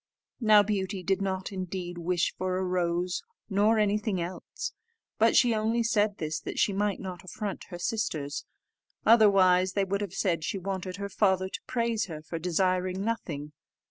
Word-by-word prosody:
Now 215 -3 +6
Beauty 195 -2 -2
did 195 +1 +1
not 190 -1 -2
indeed 180 -2 -5
wish 175 0 0
for 185 0 -1
a 190 - 0
rose, 180 0 0 0.3
nor 210 +3 +4
anything 210 -1 +1
else, 175 +2 -5 0.5
but - - +4
she 245 -2 +5
only 225 +2 +1
said 210 -3 +1
this 155 -1 -2
that - - -6
she 200 - +3
might 205 0 0
not 185 -1 -7
affront 205 +1 -5
her 175 - -8
sisters; 165 - -2 0.6
otherwise 190 -5 +5
they 200 - +2
would 200 +1 -1
have 195 -2 -4
said 170 -5 0
she 180 - -2
wanted 190 -1 -4
her 200 +1 -4
father 190 -2 +2
to - - -5
praise 230 -3 0
her 155 -4 -8
for 165 +1 -5
desiring 185 +2 0
nothing. 150 -10 -3
190 Hz, 170 wpm, -28 LUFS, 180-210 Hz, 0.6 s, Now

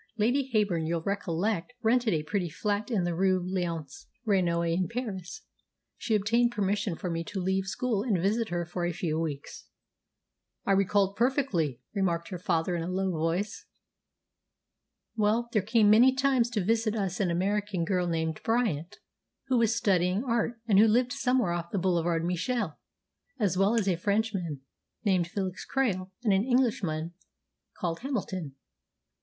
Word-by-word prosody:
Lady 255 +5 +1
Heyburn, 195 -7 +1
you'll 165 0 -1
recollect, 200 +2 -1
rented 235 0 +3
a 155 -4 0
pretty 175 +3 -2
flat 205 +5 -2
in 210 -7 +1
the 175 0 -1
Rue 185 +2 +2
Léonce 175 -6 -4 0.2
Reynaud 170 -5 +2
in 180 0 0
Paris. 215 -7 -5 0.5
She 225 - -1
obtained 230 +4 +2
permission 200 -3 -1
for 185 - -5
me 165 0 -2
to 195 - -5
leave 190 +1 0
school 210 +2 -1
and 215 -4 +1
visit 215 +5 0
her 175 0 -2
for 175 +1 -4
a 175 0 0
few 160 -2 -2
weeks." 150 -4 -5 1.0
"I - - +1
recollect 195 +1 +2
perfectly," 205 - +1
remarked 175 -4 0
her 180 -3 -5
father 175 0 0
in 170 - -2
a 165 - -3
low 190 +1 0
voice. 170 +5 -2 1.5
"Well, 220 +2 +1
there 215 - +2
came 215 +1 +4
many 250 +5 +6
times 260 -3 +2
to 215 -5 -1
visit 225 0 +1
us 195 -4 -2
an 195 -3 +1
American 195 +1 0
girl 180 0 0
named 160 -2 -2
Bryant, 210 -8 0 0.5
who 255 -2 +3
was 230 0 +3
studying 190 -1 +2
art, 235 -2 -1
and 200 -3 +5
who 220 - +7
lived 245 +4 +2
somewhere 255 -7 +1
off 170 0 -3
the 200 - -2
Boulevard 170 -2 +1
Michel, 180 - -1 0.6
as 205 -8 +1
well 195 +4 +3
as 215 -4 +1
a 180 -3 +2
Frenchman 195 -6 -1 0.4
named 185 -4 +2
Felix 185 0 -4
Krail 195 -9 0
and 210 -4 +3
an 190 +1 +3
Englishman 205 -11 0 0.6
called 170 -2 -2
Hamilton." 190 - -4
195 Hz, 160 wpm, -28 LUFS, 175-225 Hz, 1.5 s, who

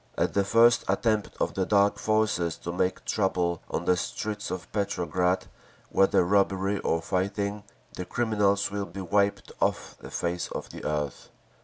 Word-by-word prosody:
At - - +1
the 100 - +3
first 115 +3 +5
attempt 105 +2 +1
of - - 0
the 95 - 0
Dark 100 +1 +3
Forces 110 -6 +1
to 85 - -3
make 90 +1 -1
trouble 90 -4 0
on 85 - -2
the 90 - +4
streets 105 +4 -4
of 90 -3 -6
Petrograd, 90 -2 0 0.5
whether 95 -2 +4
robbery 100 +1 +2
or 80 0 0
fighting, 100 +3 -1 0.3
the 90 - -5
criminals 100 -4 +1
will 100 -1 -3
be 100 - -7
wiped 100 +3 0
off - - -1
the - - -10
face 85 0 -2
of - - -6
the - - -9
earth! 75 -2 -3
100 Hz, 160 wpm, -27 LUFS, 90-105 Hz, 0.5 s, first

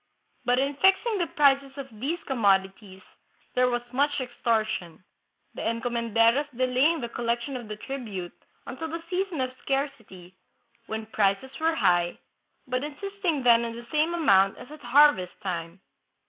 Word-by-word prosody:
But 245 0 +3
in 275 +2 +1
fixing 390 +5 +3
the 345 - 0
prices 275 -2 +2
of 275 -1 -6
these 295 +8 -1
commodities 195 -5 0 0.5
there 250 0 +3
was 240 -1 -1
much 285 +2 +1
extortion, 220 -8 -2 0.5
the - - -7
encomenderos 230 +3 +1
delaying 260 +5 +2
the 235 - -3
collection 235 +3 -2
of 240 -3 -6
the 210 - -5
tribute 210 -7 -6 0.3
until 275 +6 -5
the 330 +1 -6
season 365 -5 -1
of 255 0 -1
scarcity, 235 -10 -4 0.5
when 220 0 -4
prices 210 +3 0
were 325 +1 +1
high, 175 - +2 0.5
but 255 +1 -2
insist 395 +7 -7
ing 315 -7 +1
then 235 -1 +5
on 230 -1 -4
the 235 0 -9
same 315 +3 +1
amount 195 - +4
as 250 - -12
at 305 0 -11
harvest 250 -7 +4
time. 170 -1 -4
250 Hz, 150 wpm, -26 LUFS, 215-290 Hz, 0.5 s, then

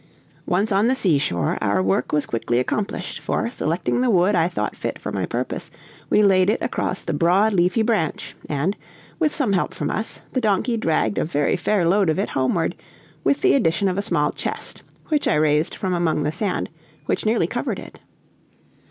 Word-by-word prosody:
Once 200 +5 +1
on 200 +3 +3
the 260 - +3
seashore, 140 - +1
our 100 -1 +1
work 95 +6 0
was 150 -1 +1
quickly 120 +1 -1
accomplished, 195 +11 -2
for, 235 - -2
selecting 170 +2 -1
the 255 - +2
wood 190 -1 +3
I 170 -3 +3
thought 180 - -3
fit - - -4
for - - -6
my - - -2
purpose, - - -3 0.4
we 210 - +4
laid 190 -1 +4
it 215 - +1
across 190 - -2
the - - -3
broad, 180 +8 +3
leafy 185 +5 +2
branch, 215 -9 -1
and, 150 +7 0 0.4
with 310 -3 +2
some 260 -10 0
help 180 - 0
from - - -2
us, 220 - -3
the 255 - 0
donkey 220 +2 +1
dragged 160 - 0
a - - +1
very 145 -2 0
fair 205 -5 +1
load 195 0 +3
of 155 - +1
it 195 - -1
homeward, 160 +6 0 0.5
with 280 - +2
the 385 - +4
addition 195 -6 +2
of 185 +1 0
a - - +1
small 205 - 0
chest, - - -5 0.3
which 300 -2 +1
I - - +3
raised 150 +1 +2
from 185 -2 -2
among 165 -4 +1
the 150 - 0
sand, 185 +3 -2 0.3
which - - -1
nearly 220 +2 +2
covered - - -3
it. - - -11
185 Hz, 195 wpm, -22 LUFS, 155-215 Hz, 0.5 s, we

